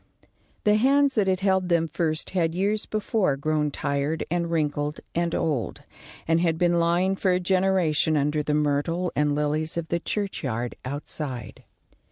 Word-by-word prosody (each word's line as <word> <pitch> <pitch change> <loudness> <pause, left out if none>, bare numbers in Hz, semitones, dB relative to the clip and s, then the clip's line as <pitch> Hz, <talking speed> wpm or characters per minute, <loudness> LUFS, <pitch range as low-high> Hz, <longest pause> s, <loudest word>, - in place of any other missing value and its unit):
The 210 0 +4
hands 275 +4 +3
that 210 -5 +1
had 185 0 +1
held 190 -2 +1
them 170 -1 +2
first 155 0 -1
had 165 -3 0
years 205 +3 0
before 210 -8 0
grown 150 +1 0
tired 140 +2 -2
and 170 -1 0
wrinkled 150 -2 -1
and 170 0 0
old, 135 - -2 0.4
and 165 +1 +3
had 165 -2 +1
been 175 0 +2
lying 175 +3 +2
for 190 - 0
a 180 0 +3
generation 185 -4 +2
under 150 +1 +1
the 150 0 -1
myrtle 150 +4 0
and 145 0 +1
lilies 150 +2 -1
of 165 -1 -3
the 170 - 0
churchyard 135 - -3
outside. 130 -3 -6
165 Hz, 160 wpm, -25 LUFS, 150-185 Hz, 0.4 s, The